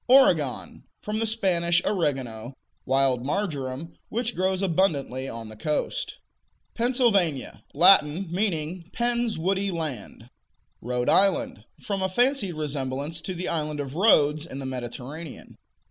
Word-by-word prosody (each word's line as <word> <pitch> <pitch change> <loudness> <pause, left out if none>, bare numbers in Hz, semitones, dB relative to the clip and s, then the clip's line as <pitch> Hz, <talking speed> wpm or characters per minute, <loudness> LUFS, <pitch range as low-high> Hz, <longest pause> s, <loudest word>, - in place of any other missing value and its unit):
Oregon 175 - +3 0.2
From 215 +1 -2
the 225 - 0
Spanish 175 -6 +2
"oregano," 130 - -2 0.3
wild 135 -2 +2
marjoram, 145 -3 -3 0.2
which 235 +1 -1
grows 185 +1 0
abundantly 150 -8 0
on 115 -1 -7
the 110 - -10
coast. 155 - -2 0.6
Pennsylvania 230 - +1
Latin; 175 0 +5
meaning 175 -3 -2
Penn's 240 -1 0
woody 195 +4 0
land. 135 - -5 0.5
Rhode 125 +1 -2
Island 255 +7 +2 0.2
From 200 -2 -2
a 190 - 0
fancied 245 -2 +1
resemblance 145 +1 -3
to 185 - -5
the 175 +1 -4
island 150 -2 -2
of 140 -2 -4
Rhodes 155 -5 +4
in 135 - -7
the 135 - -5
Mediterranean. 130 +5 -7
165 Hz, 125 wpm, -26 LUFS, 135-195 Hz, 0.6 s, Latin